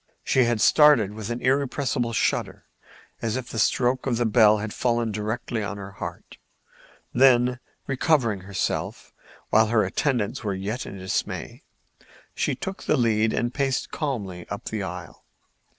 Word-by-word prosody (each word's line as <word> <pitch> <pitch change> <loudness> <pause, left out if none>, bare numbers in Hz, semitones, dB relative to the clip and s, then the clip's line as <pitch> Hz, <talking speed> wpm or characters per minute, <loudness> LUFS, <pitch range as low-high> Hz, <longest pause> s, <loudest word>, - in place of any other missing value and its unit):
She 130 -2 +3
had 120 -2 0
started 145 -10 +5
with 110 0 -6
an 120 +1 -3
irrepressible 135 -2 0
shudder, 115 - -1 0.6
as 115 0 -1
if 130 -2 -4
the 115 - -3
stroke 125 +4 +1
of 120 -3 +1
the 120 - +1
bell 110 -1 +5
had 105 0 -5
fallen 120 -2 0
directly 110 +2 -3
on 100 0 -4
her 100 -1 -8
heart; 100 - -8 0.8
then, 125 -1 +4 0.3
recovering 130 -6 +1
herself, 95 0 -3 0.4
while 110 +1 +5
her 110 -1 +3
attendants 125 -4 -1
were 100 -2 -1
yet 105 +6 -4
in 100 - -8
dismay, 95 0 -3 0.7
she - - -1
took 190 0 -6
the 155 - +2
lead 110 -2 +2
and 120 +2 -1
paced 135 -2 -1
calmly 100 - -4
up 100 - -6
the 110 -2 -3
aisle. 90 -2 -7
115 Hz, 150 wpm, -25 LUFS, 105-130 Hz, 0.8 s, started